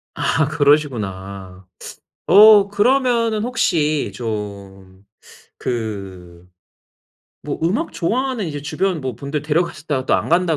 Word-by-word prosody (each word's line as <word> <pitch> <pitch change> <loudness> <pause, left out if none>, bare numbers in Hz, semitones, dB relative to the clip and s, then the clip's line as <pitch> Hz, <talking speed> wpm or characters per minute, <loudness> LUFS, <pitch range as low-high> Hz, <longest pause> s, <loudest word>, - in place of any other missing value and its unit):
아 155 -2 0
그러시구나. 100 - -1 0.6
어 205 0 +7
그러면은 230 0 +1
혹시 165 - 0
좀 100 -4 -7 0.5
그 95 -7 -6 1.0
뭐 - - -4
음악 210 - -1
좋아하는 240 +2 -2
이제 145 -2 -6
주변 180 0 -2
뭐 130 -2 -4
분들 140 +3 -4
데려가셨다가 150 -3 -2
또 - - +2
안 - - -1
간다 170 -2 +2
150 Hz, 220 characters per minute, -19 LUFS, -, 1.0 s, 어